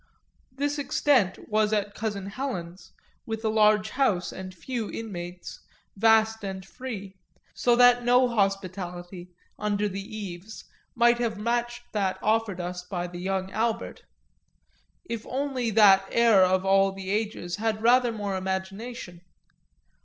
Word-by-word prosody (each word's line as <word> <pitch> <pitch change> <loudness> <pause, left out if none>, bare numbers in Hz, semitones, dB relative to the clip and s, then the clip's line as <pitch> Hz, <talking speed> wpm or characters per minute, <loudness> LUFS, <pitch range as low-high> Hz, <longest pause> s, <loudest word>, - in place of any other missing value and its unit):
This 290 +3 -2
extent 265 -8 +2
was 215 0 +1
at 205 -1 0
cousin 205 -3 -4
Helen's, 195 -6 -6 0.4
with 225 0 -4
a - - +3
large 215 0 +3
house 210 -10 +1
and 190 0 -7
few 225 +4 -5
inmates, 180 -5 -7 0.4
vast 220 +1 +3
and 190 -1 -5
free, 205 -4 -7 0.4
so 240 -1 +2
that 245 0 +6
no 250 +1 +4
hospitality, 185 -4 -3 0.3
under 210 0 0
the 195 0 -5
eaves, 200 0 -8 0.3
might 240 0 +4
have 230 -3 -1
matched 240 +2 -2
that 195 -3 0
offered 215 -3 +1
us 180 0 -4
by 180 -1 -4
the 175 0 -8
young 190 +1 -2
Albert 230 +2 -2 1.0
if 230 -9 -5
only 260 -3 -2
that 195 -3 +6
heir 230 -4 +5
of 185 +1 +3
all 195 0 +4
the 195 0 -6
ages 210 -4 -2
had 220 0 0
had 215 - -11
rather 245 +1 +5
more 205 -3 -3
imagination. 190 +1 -5
210 Hz, 140 wpm, -26 LUFS, 190-235 Hz, 1.0 s, that